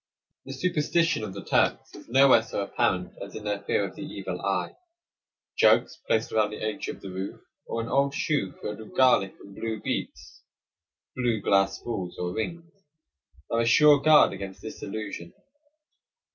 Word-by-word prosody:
The 135 - -6
superstition 165 -1 +1
of 100 -3 -6
the 100 - -8
Turks - - +1
is - - -13
nowhere 130 -1 +6
so 110 - -4
apparent - - -1
as - - -8
in 110 - -7
their 105 -1 -2
fear 100 0 0
of 95 - -12
the - - -9
"evil 150 +1 -6
eye." - - -1 0.8
Jugs - - +4
placed 110 0 +1
around 110 -1 +2
the 105 - -7
edge 110 -1 -3
of - - -6
the 95 - -8
roof, 95 +1 -5 0.3
or 115 - -2
an 115 - -5
old 140 +3 +1
shoe 145 - -1
filled 105 0 -4
with 110 - -12
garlic 125 -7 +4
and 100 - -13
blue 110 +1 -4
beets - - -5 0.7
(blue 120 -3 0
glass 95 -1 +2
balls 95 -7 -4
or 90 0 -3
rings) 165 +8 -5 0.8
are 115 - +1
a - - +1
sure 145 +5 +6
guard 155 0 +6
against 95 -1 -7
this 110 - -8
illusion. 100 -5 -6
110 Hz, 175 wpm, -27 LUFS, 100-135 Hz, 0.8 s, nowhere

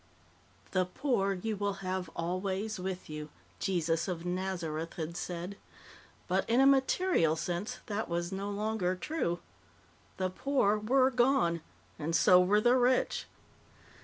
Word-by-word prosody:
"The 185 -1 +2
poor 200 -3 0
you 215 +4 -3
will 200 -1 -3
have 185 -2 -2
always 190 +4 -2
with 185 0 -4
you," 150 0 -6 0.3
Jesus 170 -3 0
of 175 -2 -4
Nazareth 175 -3 -3
had 165 0 -4
said. 180 +3 -5 0.7
But, 190 +3 0
in 235 +2 +4
a 270 - +6
material 275 - +3
sense, 175 +4 -3
that 215 +1 -3
was 170 +1 -2
no 195 +1 -3
longer 205 -3 -1
true. 180 - -2 0.8
The 185 -1 -1
poor 235 -2 +1
were 260 +5 +3
gone 235 - +2 0.4
and 160 +2 -1
so 180 +1 +7
were 200 +3 +4
the 240 +3 +4
rich. 250 +1 +2
190 Hz, 135 wpm, -31 LUFS, 175-220 Hz, 0.8 s, so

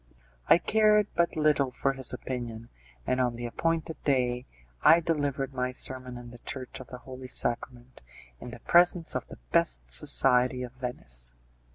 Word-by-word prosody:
I - - +8
cared 210 +2 +3
but 170 0 +1
little 150 -3 +2
for 135 +2 -1
his 130 -2 -1
opinion, 120 -3 -6 0.4
and 130 0 +1
on 125 -2 0
the 120 +1 -6
appointed 160 +5 -2
day 125 -3 0 0.3
I 165 +2 +7
delivered 145 -5 -2
my 125 -1 -1
sermon 130 -1 -2
in 120 -1 -10
the 120 - -13
Church 130 +2 -6
of 130 - -10
the 125 - -9
Holy 130 0 -10
Sacrament 120 0 -1 0.4
in - - -8
the 120 - -10
presence 175 -1 +3
of - - -4
the - - -11
best - - +1
society 125 - +4
of 125 - -7
Venice. 60 - -5
130 Hz, 165 wpm, -28 LUFS, 120-145 Hz, 0.4 s, I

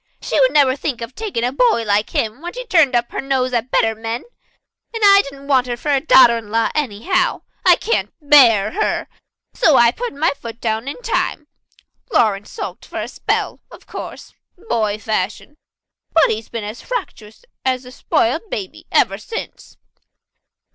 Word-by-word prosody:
"She - - -1
would - - +4
never 275 -3 +4
think 275 -3 -3
of 230 +2 -6
taking 400 - -3
a 245 - +1
boy 285 - +2
like 210 0 +1
him 220 +5 -2
when 350 +1 -6
she'd - - -8
turned 305 -8 +4
up 240 0 0
her - - -3
nose 260 -2 -1
at 240 +1 -1
better 225 -2 +2
men. 225 +2 -5 0.7
And 450 - -3
I 400 0 +8
didn't 275 -2 -11
want 260 -3 +2
her 240 -1 -3
for 295 +4 -2
a 275 -2 +2
daughter 240 -6 +6
in 215 -2 -13
law 225 +1 +1
anyhow. 300 - -1 0.2
I - - +7
can't 465 - -1
bear 250 -9 +5
her. 430 - -1 0.5
So 315 - +3
I 235 -2 +6
put 485 - -5
my 315 +4 +1
foot 230 -2 -9
down 225 +2 -2
in 285 - -5
time. 310 -9 -1 0.7
Lawrence 210 - +1
sulked 430 - -7
for - - -6
a - - -3
spell, - - -2
of - - -15
course - - -9 0.2
boy 225 - -1
fashion 215 +5 -3 0.6
and - - +4
he's 220 0 -4
been 230 -2 -5
as 210 +3 -7
fractious 455 - -6 0.2
as 255 -1 -1
a 250 - -11
spoiled 275 - -1
baby 195 - -6
ever 195 +1 +2
since." 450 - -8
255 Hz, 180 wpm, -19 LUFS, 225-310 Hz, 0.7 s, I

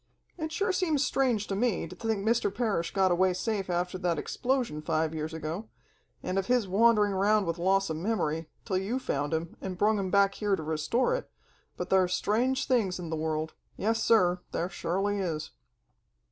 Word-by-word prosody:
"It 315 -2 -4
sure 385 +4 0
seems 320 -6 +1
strange 245 -6 +1
to 195 - -3
me, 220 -4 0
to 185 - -10
think 220 -1 -2
Mr. 230 -2 +2
Parrish 205 -6 -1
got 190 -2 +2
away 185 +1 +3
safe 200 -1 -2
after 180 +1 -1
that 175 -2 0
explosion 250 - -1
five 160 0 0
years 155 0 -3
ago, 160 +6 -5 0.5
and 185 +1 0
of 195 - -3
his 245 -4 +2
wandering 210 +1 +4
around 205 +2 +3
with 170 0 -2
loss 195 +2 +2
of 155 - -3
memory, 165 -5 -1 0.2
till 190 -4 0
you 205 +7 -2
found 145 - -2
him, 165 +1 -2
and 185 -2 -5
brung 210 +2 +3
him 190 -1 -2
back 200 +1 +4
here 205 -1 0
to 160 - -6
restore 160 - 0
it, - - -3 0.5
but - - -5
thar's 185 -1 +4
strange 250 +5 +1
things 220 -8 +1
in 170 -3 -6
the - - 0
world 155 0 -2 0.2
yes, 225 +2 0
sir, 180 -5 +4
thar 175 - -2
surely 195 +3 -1
is!" 160 -5 -3
195 Hz, 190 wpm, -29 LUFS, 170-225 Hz, 0.5 s, wandering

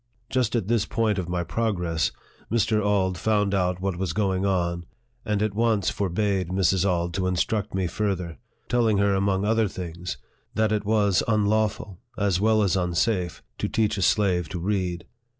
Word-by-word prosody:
Just 125 -3 +1
at 110 -5 0
this 115 -2 +1
point 110 -3 0
of 90 -2 -4
my 90 0 -1
progress, 90 -7 -1 0.4
Mr. 110 -1 +2
Auld 95 -3 +1
found 105 -2 +1
out 90 -2 +1
what 95 -1 -2
was 90 -3 -2
going 95 -2 0
on, 85 -2 -1 0.4
and 105 -1 0
at 105 -2 -1
once 110 -2 +1
forbade 95 -1 0
Mrs. 95 -1 +2
Auld 85 -1 -1
to 95 +1 -1
instruct 95 +3 -1
me 95 -1 0
further, 90 -4 -2 0.3
telling 115 -4 +2
her, 100 0 +3
among 95 0 +1
other 110 0 +2
things, 90 -2 -6 0.4
that 110 0 +2
it 105 -1 0
was 105 -3 +3
unlawful, 105 -2 0 0.2
as 100 -3 +1
well 110 0 +3
as 95 -3 +2
unsafe, 90 0 0 0.2
to - - 0
teach 110 -1 +1
a 100 - -3
slave 90 -4 +2
to 90 - -4
read. 90 -2 -2
100 Hz, 170 wpm, -25 LUFS, 90-105 Hz, 0.4 s, her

